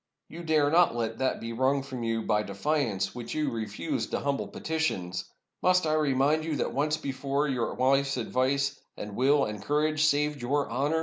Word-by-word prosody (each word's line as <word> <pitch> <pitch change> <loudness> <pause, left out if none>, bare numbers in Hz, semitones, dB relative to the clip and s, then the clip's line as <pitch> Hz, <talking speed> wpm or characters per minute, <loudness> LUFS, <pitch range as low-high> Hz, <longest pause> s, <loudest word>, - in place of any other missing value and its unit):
You 170 - -8
dare 155 -3 +2
not 170 -6 +4
let 115 -1 -2
that 130 0 0
be 115 0 -5
wrung 130 +3 +1
from 130 -3 -6
you 115 -1 -1
by 105 0 +2
defiance 105 -1 -1
which 120 +2 -6
you 150 -3 0
refused 105 -6 -3
to - - -2
hum 140 -1 0
ble - - -4
petitions! 95 - -2 0.4
Must 180 -1 +3
I 155 - +1
remind 150 0 +2
you 160 -1 -2
that - - -2
once 150 +4 +1
before 140 +1 -1
your 125 -4 -1
wife's 135 +1 +2
advice, 130 +3 0 0.2
and 105 -1 -6
will, 140 +4 +3
and 105 -1 -5
courage, 155 +5 +1
saved 150 -1 +1
your 140 +4 0
honor? 145 +6 +1
140 Hz, 190 wpm, -28 LUFS, 115-150 Hz, 0.4 s, not